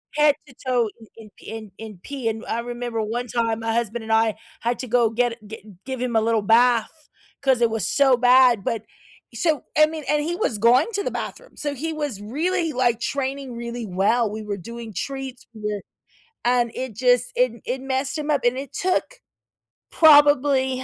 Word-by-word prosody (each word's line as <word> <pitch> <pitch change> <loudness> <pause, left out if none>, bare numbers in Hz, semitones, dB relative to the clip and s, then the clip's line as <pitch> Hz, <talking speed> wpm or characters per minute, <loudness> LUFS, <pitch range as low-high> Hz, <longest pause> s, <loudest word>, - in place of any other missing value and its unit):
head 300 -1 +4
to 265 - -15
toe 245 -4 +2
in 225 - -15
in 220 -2 -12
pee - - -14
in 220 -2 -8
in 215 -4 -9
pee, 270 -5 -3
and 225 +1 -5
I 230 - -2
remember 240 -1 -4
one 235 +3 -3
time 230 -1 -1
my 225 0 -1
husband 235 0 -2
and 220 0 -1
I 220 -1 +3 0.3
had 240 +1 -1
to 255 - -5
go 240 -1 +3
get 235 +1 0
gi 220 +1 -9 0.2
give 260 -2 -4
him 250 -2 -2
a 220 - +4
little 225 -1 +1
bath, 240 +7 +2 0.3
'cause 265 -3 +2
it 235 - +4
was 225 -2 -1
so 270 -3 +4
bad, 245 -3 +5
but 225 +1 -2 0.5
so, 310 -6 0
I 305 0 +6
mean, 315 -1 -6
and 300 0 +2
he 340 +3 -2
was 235 - -1
going 235 +4 +5
to 405 0 -1
the - - -1
bathroom, - - -7
so 290 -1 -2
he 315 +4 -4
was 295 -10 -3
really, 325 - -1
like, 245 -4 +1
training 270 0 -3
really 235 0 -5
well, 205 +5 +1
we 215 +1 -6
were 205 -1 -4
doing 230 +4 -9
treats 265 +5 -6
we're 210 -2 -4 0.6
and 240 -1 +2
it 255 -3 -5
just 245 +1 +2
it 245 -2 +1
it 255 +2 -3
messed 265 +2 -2
him 300 0 -3
up 285 -4 +1
and 245 +1 +2
it 270 -1 -7
took 370 +7 -1 0.8
probably 290 -4 +5
245 Hz, 200 wpm, -23 LUFS, 225-275 Hz, 0.8 s, I